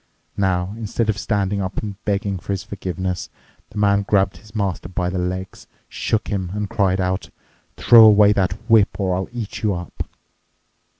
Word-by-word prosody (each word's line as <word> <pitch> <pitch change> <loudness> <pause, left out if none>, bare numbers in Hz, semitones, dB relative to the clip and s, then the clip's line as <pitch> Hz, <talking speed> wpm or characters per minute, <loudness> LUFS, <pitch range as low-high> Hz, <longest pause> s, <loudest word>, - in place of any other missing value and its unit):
Now, 95 -1 0
instead 110 0 -2
of 110 0 0
standing 100 -2 0
up 95 0 -4
and 105 0 -5
begging 100 -2 -1
for 100 +3 -3
forgiveness, 95 -2 -4 0.4
the - - -11
man 100 -1 +3
grabbed 100 -1 +1
his 105 0 -18
master 95 -5 -2
by 90 -1 -2
the 95 - -2
legs, 90 +1 -4 0.2
shook 110 - -2
him, 95 -4 -2
and 105 -1 -2
cried 95 -2 +1
out, 95 0 -1 0.5
'Throw 115 -2 +8
away 105 -1 +7
that 95 -3 +1
whip 110 -4 +4
or 95 -2 +1
I'll 95 +1 -3
eat 120 -4 -6
you 105 -3 +1
up. 90 -1 -7
100 Hz, 170 wpm, -21 LUFS, 95-105 Hz, 0.5 s, Throw